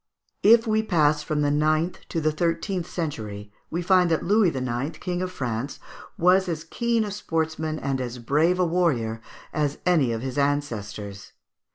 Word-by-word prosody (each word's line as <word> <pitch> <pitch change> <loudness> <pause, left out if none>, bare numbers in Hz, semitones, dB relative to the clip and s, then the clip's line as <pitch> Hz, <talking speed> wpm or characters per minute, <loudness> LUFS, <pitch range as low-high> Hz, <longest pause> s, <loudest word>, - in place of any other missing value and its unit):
138). 230 +3 +7
If 225 - -12
we 220 0 +2
pass 155 -8 +2
from 150 0 -1
the 145 - +2
ninth 155 +3 +1
to 165 - -1
the 155 0 +1
thirteenth 170 +3 -1
century, 105 - -5 0.2
we 175 +2 -2
find 180 -1 +4
that 160 - +1
Louis 205 0 +4
IX., 130 +1 -3
king 180 -1 -3
of 185 0 -2
France, 125 -3 -3 0.4
was 185 +2 +4
as 160 -2 -3
keen 230 +6 0
a 205 - -4
sportsman 160 -5 -2
and 135 -3 -2
as 125 0 -4
brave 150 +9 +2
a 180 - +4
warrior 135 -11 0 0.3
as 150 -1 0
any 160 -9 +3
of 115 +1 -3
his 130 +1 -3
ancestors. 110 -8 -3
155 Hz, 175 wpm, -25 LUFS, 130-180 Hz, 0.4 s, 138